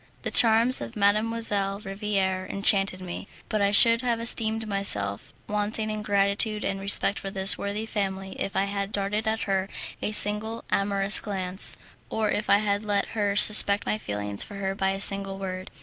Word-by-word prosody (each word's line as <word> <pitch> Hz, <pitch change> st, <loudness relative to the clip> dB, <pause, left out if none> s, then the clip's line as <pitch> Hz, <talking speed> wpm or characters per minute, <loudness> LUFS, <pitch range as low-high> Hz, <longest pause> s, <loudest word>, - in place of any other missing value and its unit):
The -, -, -4 dB
charms 230 Hz, +2 st, +5 dB
of 115 Hz, -, -8 dB
Mdlle. 205 Hz, -1 st, -1 dB
Riviere 195 Hz, -2 st, -3 dB
enchanted 195 Hz, -1 st, 0 dB
me, 180 Hz, +1 st, -8 dB, 0.2 s
but 215 Hz, -, -2 dB
I 200 Hz, -, +1 dB
should 230 Hz, +3 st, +7 dB
have 240 Hz, -2 st, -2 dB
esteemed 225 Hz, -1 st, +4 dB
myself 105 Hz, -, -2 dB, 0.2 s
wanting 210 Hz, +1 st, -2 dB
in 215 Hz, 0 st, -5 dB
gratitude 205 Hz, +1 st, -1 dB
and 195 Hz, 0 st, -4 dB
respect 200 Hz, 0 st, +2 dB
to 195 Hz, -, -6 dB
this 195 Hz, 0 st, +3 dB
worthy 205 Hz, +2 st, -5 dB
family 195 Hz, -3 st, -5 dB
if 195 Hz, -, -5 dB
I 195 Hz, -, +1 dB
had 200 Hz, 0 st, -5 dB
darted 210 Hz, +2 st, -2 dB
at 220 Hz, 0 st, -2 dB
her 195 Hz, -1 st, -3 dB, 0.3 s
a -, -, -3 dB
single 215 Hz, +2 st, +1 dB
amorous 200 Hz, 0 st, +1 dB
glance, 190 Hz, -2 st, -1 dB, 0.3 s
or 215 Hz, -1 st, -2 dB
if 210 Hz, -, -4 dB
I 200 Hz, -, +5 dB
had 205 Hz, 0 st, -2 dB
let 205 Hz, -1 st, -2 dB
her 205 Hz, -2 st, -3 dB
suspect 205 Hz, -1 st, +6 dB
my 215 Hz, -, -3 dB
feelings 105 Hz, -, -3 dB
for 205 Hz, -, -6 dB
her 195 Hz, -1 st, -4 dB
by 190 Hz, -1 st, -2 dB
a 195 Hz, 0 st, -4 dB
single 195 Hz, -1 st, -2 dB
word. 185 Hz, -1 st, -7 dB
200 Hz, 180 wpm, -24 LUFS, 195-215 Hz, 0.3 s, should